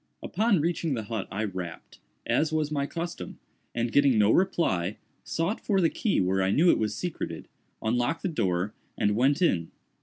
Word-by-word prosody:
Upon 210 -6 +2
reaching 165 -2 0
the 110 - -3
hut 110 -1 -4
I 105 +4 -2
rapped, 90 -5 -6 0.3
as 160 0 +1
was 155 -1 0
my 140 -2 0
custom, 170 - -5 0.4
and 115 0 0
getting 140 -4 +4
no 105 0 +5
reply, 105 - +1 0.3
sought 165 +7 -2
for 200 -3 +2
the 165 -3 +3
key 215 - 0
where 95 +1 +2
I 95 - +2
knew 165 - +5
it - - +1
was 105 -1 -1
secreted, 110 - -4 0.4
unlocked 120 +7 0
the - - +1
door 95 - 0 0.2
and 105 0 +2
went 140 +8 +3
in. 85 - +2
120 Hz, 180 wpm, -27 LUFS, 100-165 Hz, 0.4 s, no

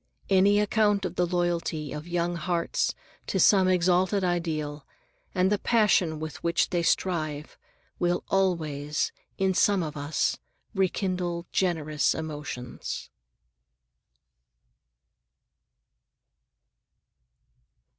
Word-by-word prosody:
Any 200 +2 +5
account 210 -1 +2
of - - -3
the 180 0 +1
loyalty 170 -4 -1
of 150 +3 -7
young 175 0 -1
hearts 170 0 -1 0.3
to 190 - -1
some 190 +1 +5
exalted 185 +2 +2
ideal, 155 -5 -2 0.5
and 185 +1 +3
the 205 - +2
passion 195 -9 +2
with 155 -1 -7
which 170 0 +1
they 175 -2 +1
strive, 155 -4 -1 0.4
will 175 0 +1
always, 155 -6 0 0.3
in 190 -1 +2
some 195 0 +3
of 155 -1 -5
us, 145 +1 -1 0.3
rekindle 180 -3 -1
generous 155 -5 +1
emotions. 145 -6 -6
175 Hz, 95 wpm, -27 LUFS, 155-190 Hz, 0.5 s, Any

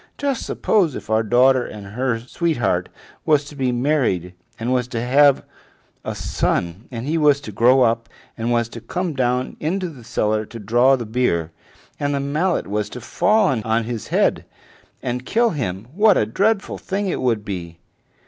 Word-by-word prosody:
Just 280 -3 -2
suppose, 180 - +1
if - - -7
our 110 0 +3
daughter 125 +3 +4
and 105 -3 -8
her 125 0 0
sweetheart 145 +3 -1 0.3
was 150 -2 +3
to 145 - -11
be 130 -3 0
married, 120 - 0 0.3
and 120 +3 -1
was 125 -1 0
to 120 -2 -4
have 135 +3 +4 0.6
a - - -4
son, 90 +5 -1
and 120 -1 -6
he 160 +3 0
was 145 -2 +4
to 125 - -8
grow 125 +5 +4
up, 115 -1 +1 0.3
and 115 +1 -2
was 120 -1 +2
to 115 - -9
come 180 +4 -3
down 125 -1 -1
into 180 +4 -1
the 135 -7 -12
cellar 110 -2 0
to 115 - -10
draw 120 +5 +3
the 120 -3 -5
beer, 105 -8 0 0.5
and 145 0 0
the - - 0
mallet 155 +6 0
was 105 +1 -2
to 125 - -7
fall 135 - +2
on 110 +1 +1
his 115 -2 -5
head - - +1 0.6
and 125 0 -2
kill 230 - +2
him, 100 - -3
what 210 +2 +5
a - - +2
dreadful 200 - 0
thing 200 +1 -2
it 190 - -2
would 115 -5 0
be!" 85 -4 -6
125 Hz, 180 wpm, -21 LUFS, 115-150 Hz, 0.6 s, what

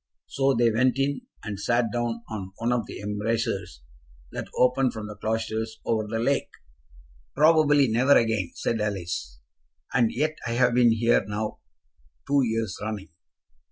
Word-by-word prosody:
So 135 0 +1
they 115 0 +3
went 125 +4 +2
in, 140 - -1 0.2
and 105 -3 -5
sat 120 +1 +1
down 120 -1 -2
on 95 -4 -6
one 115 +1 -1
of 120 -3 0
the - - -8
embrasures 105 - -2 0.5
that - - -5
open 125 +1 +3
from 110 -2 -6
the 105 0 -8
cloisters 110 +1 -3
over 110 -2 0
the 115 +1 -2
lake. 135 +5 0 0.9
"Probably 150 -2 +5
never 125 +5 +4
again," 110 -6 +1
said 115 -2 -1
Alice. 85 - -3 0.5
"And 120 -3 +3
yet 155 +5 -1
I 115 - -1
have 125 0 +3
been 120 -1 +5
here 115 +1 +3
now 105 +1 -3 0.7
two 140 0 +3
years 110 -4 -1
running." 105 -2 -5
115 Hz, 155 wpm, -26 LUFS, 105-125 Hz, 0.9 s, Probably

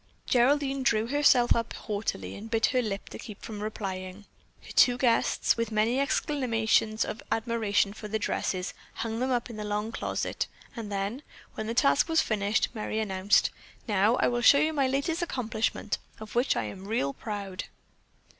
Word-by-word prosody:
Geraldine 275 +2 +2
drew 225 -3 +2
herself 255 -2 +4
up 230 -1 -2
haughtily 200 - -4
and 220 +2 -8
bit 225 0 +2
her 255 - +3
lip 205 -4 -4
to - - -9
keep 210 -5 -10
from 210 -2 -6
replying. 195 -2 -5 0.4
Her - - -10
two 245 -1 +5
guests, 245 -2 +2
with 230 -1 -1
many 220 +4 +2
exclamations 230 -7 +1
of 220 - -5
admiration 220 -3 +1
for 215 0 -8
the 220 +1 -1
dresses, 185 -3 -2 0.2
hung 225 0 -3
them 255 +1 0
up 245 -2 0
in 230 -3 -9
the 210 - -4
long 210 +1 -2
closet, - - -2 0.3
and 220 -4 -6
then, 200 +6 -2 0.3
when 215 - -5
that 230 +1 -3
task 285 +3 +4
was 325 0 +3
finished, 210 -5 +1
Merry 215 -1 -3
announced: 195 -1 +2 0.4
"Now 210 +2 +3
I - - +2
will 240 0 0
show 280 - +7
you 310 +2 +2
my 275 -3 +2
latest 280 +6 -1
accomplishment, 225 -8 -2 0.2
of 215 -1 -9
which 245 +3 +2
I 115 - 0
am 185 - -7
real 140 -11 0
proud." 200 -1 -5
225 Hz, 175 wpm, -28 LUFS, 205-250 Hz, 0.4 s, show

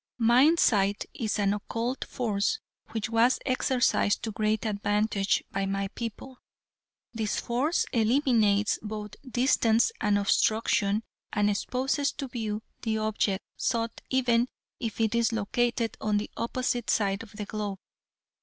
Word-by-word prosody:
"Mind 250 +8 +5
sight 200 -2 +3
is 225 -6 -2
an 200 -1 +2
occult 230 +5 -3
force 220 - -1 0.3
which 220 -2 -2
was 230 +3 +4
exercised 255 -5 +2
to 225 - -2
great 215 +1 0
advantage 205 -1 +1
by 195 0 -1
my 195 0 -1
people. 235 +4 -7 0.7
This 220 -3 -1
force 265 +8 0
eliminates 220 -4 +3
both 210 -1 -6 0.2
distance 240 - +3
and 210 -2 +3
obstruction 210 +1 +2 0.3
and 210 -1 +2
exposes 265 +7 0
to 275 - -5
view 220 -3 -4 0.2
the 220 -1 -1
object 215 -2 0
sought 230 -2 -1
even 245 -2 +2 0.3
if 230 -2 -4
it 220 -1 +2
is 235 0 +2
located 230 +2 0
on 210 -1 +1
the 205 - -3
opposite 245 0 -2
side 200 -2 +1
of 230 -3 -12
the 210 0 -5
globe. 205 -2 -4
220 Hz, 135 wpm, -28 LUFS, 205-240 Hz, 0.7 s, Mind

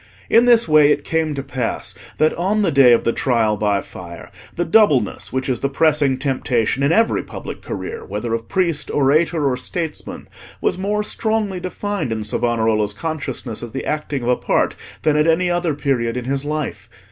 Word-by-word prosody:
In 230 +2 +6
this 235 -1 +5
way 155 -2 +6
it 145 0 +1
came 160 -2 -1
to 135 - -4
pass 130 -4 -3 0.2
that 155 - +3
on 200 +5 0
the 175 - +2
day 135 -3 +6
of 120 - +4
the 115 - +1
Trial 115 -5 +1
by 105 -1 0
Fire, 85 -2 -10 0.2
the 175 - -1
doubleness 160 - +2
which 130 0 -2
is 130 -2 -1
the 140 - -1
pressing 145 -2 +2
temptation 130 -2 0
in 140 +2 +3
every 225 +6 +3
public - - -8
career, 455 +1 -6
whether 120 - -4
of 115 0 -4
priest, 170 -6 0
orator, 150 +2 +2
or 125 -2 0
statesman, 160 +4 -5 0.3
was - - 0
more 205 +3 -1
strongly 215 -3 -1
defined 185 - -3
in 110 -1 -2
Savonarola's 110 -2 0
consciousness 150 -6 -4
as 120 -2 -8
the 135 - -4
acting 150 -3 -2
of 120 - -1
a 125 - +3
part, - - 0 0.3
than 155 - +3
at 150 +1 +3
any 175 +2 +2
other 175 -3 0
period 125 -5 -1
in 125 - -4
his 135 +1 -1
life. 150 -1 -4
145 Hz, 190 wpm, -20 LUFS, 120-170 Hz, 0.3 s, In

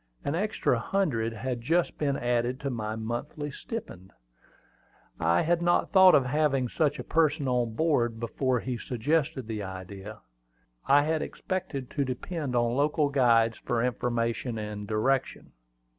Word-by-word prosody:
An 140 - 0
extra 175 - 0
hundred 120 -8 0
had 120 +2 -4
just 165 +8 0
been 140 -2 0
added 120 +1 0
to 140 -1 -2
my 110 -2 -3
monthly 120 +6 -4
stipend. 115 - -7 1.1
I 85 +1 +3
had 170 +1 +1
not 175 0 +2
thought 190 -1 +8
of 135 - +4
having 135 -2 +1
such 145 +1 +1
a - - -5
person 155 -3 +1
on 120 -3 0
board 120 -8 +1
before 125 +2 0
he 125 -2 -4
suggested 140 +2 -1
the 110 -2 -4
idea. 95 +2 -8 0.7
I 145 +1 +6
had 155 +1 0
expected 140 -9 -4
to 145 - 0
depend 135 +2 -4
on 120 0 +2
local 145 +1 +2
guides 115 -5 +3
for 120 -1 -1
information 120 -1 -1
and 105 -1 -5
direction. 125 +5 -1
125 Hz, 145 wpm, -28 LUFS, 115-150 Hz, 1.1 s, thought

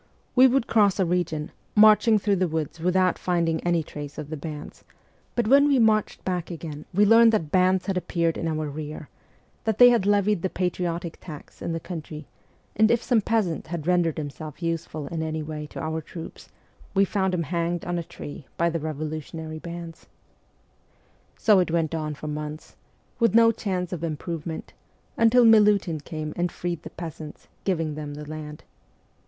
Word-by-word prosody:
We 260 +1 +8
would 260 -1 +2
cross 205 -4 +3
a 190 - +3
region, 170 -3 -1 0.2
marching 215 +1 +6
through 200 -1 +1
the 185 0 +1
woods 160 0 -3
without 180 +1 +2
finding 170 -3 0
any 170 -2 +1
trace 145 -1 -8
of 150 0 -7
the - - -2
bands; 150 0 -8 0.5
but 240 -3 +1
when 280 +4 +6
we 280 -2 +4
inarched 220 -3 +2
back 180 -3 -2
again 155 -3 -7
we 200 +3 +4
learned 225 +2 +7
that 160 -9 0
bands 185 0 +3
had 195 -2 -1
appeared 170 -2 0
in 165 - -3
our 155 -1 -2
rear, 150 0 -7 0.5
that 220 -2 0
they 245 0 +9
had 225 -5 +2
levied 205 -2 +2
the 190 - -1
patriotic 175 -2 -3
tax 155 -5 -11
in - - -3
the 165 - -2
country, 155 -3 -7 0.5
and 220 +1 +4
if 235 0 +2
some 235 -4 +3
peasant 200 -8 -1
had 165 -2 -5
rendered 175 -3 +2
himself 155 +2 -7
useful 165 -2 -3
in 165 -1 -3
any 160 -1 -3
way 150 0 -6
to - - -9
our 160 0 -3
troops 165 +1 -10 0.5
we 195 +1 +5
found 190 -1 0
him 175 -2 0
hanged 170 +2 -2
on 175 0 -1
a - - -4
tree 145 -3 -9
by 170 0 +2
the 165 - -2
revolutionary 155 +1 -5
bands. 170 0 -8 1.3
So 210 -3 +5
it 180 - +1
went 165 -1 0
on 155 -2 -3
for 155 - -8
months, 150 +1 -6 0.4
with 230 -3 +3
no 230 0 +7
chance 185 -5 -3
of 170 -2 -5
improvement, 165 0 -5 0.4
until 230 +2 +5
Milutin 205 -7 +5
came 155 0 -6
and 175 0 -1
freed 175 -2 -4
the - - -8
peasants, 160 -2 -9 0.2
giving 165 -5 0
them 150 -1 -6
the 150 0 -8
land. 150 -1 -8
170 Hz, 180 wpm, -25 LUFS, 155-195 Hz, 1.3 s, they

